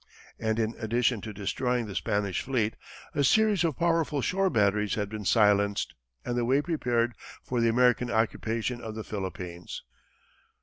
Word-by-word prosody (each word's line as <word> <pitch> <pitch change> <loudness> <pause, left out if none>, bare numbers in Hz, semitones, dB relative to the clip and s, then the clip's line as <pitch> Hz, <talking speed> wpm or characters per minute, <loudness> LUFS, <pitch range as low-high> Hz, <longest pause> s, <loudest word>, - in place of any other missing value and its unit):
And, 110 -1 0
in 115 0 0
addition 115 0 +1
to 110 - -6
destroying 120 +4 -1
the 105 - -7
Spanish 100 -1 -1
fleet, 115 -5 0 0.4
a 145 - +1
series 210 +4 +4
of 160 -6 0
powerful 165 -3 +1
shore 190 +7 +1
batteries 105 - +2
had 105 -2 -2
been 105 -1 -6
silenced, 100 -1 +3 0.3
and 120 - -2
the 120 - +1
way 130 +4 +3
prepared 125 -7 0 0.3
for 125 -2 -1
the 115 - +4
American 125 +1 +3
occupation 115 +2 -1
of 110 -1 -6
the 110 - -5
Philippines. 90 -4 -6
115 Hz, 160 wpm, -28 LUFS, 105-125 Hz, 0.4 s, series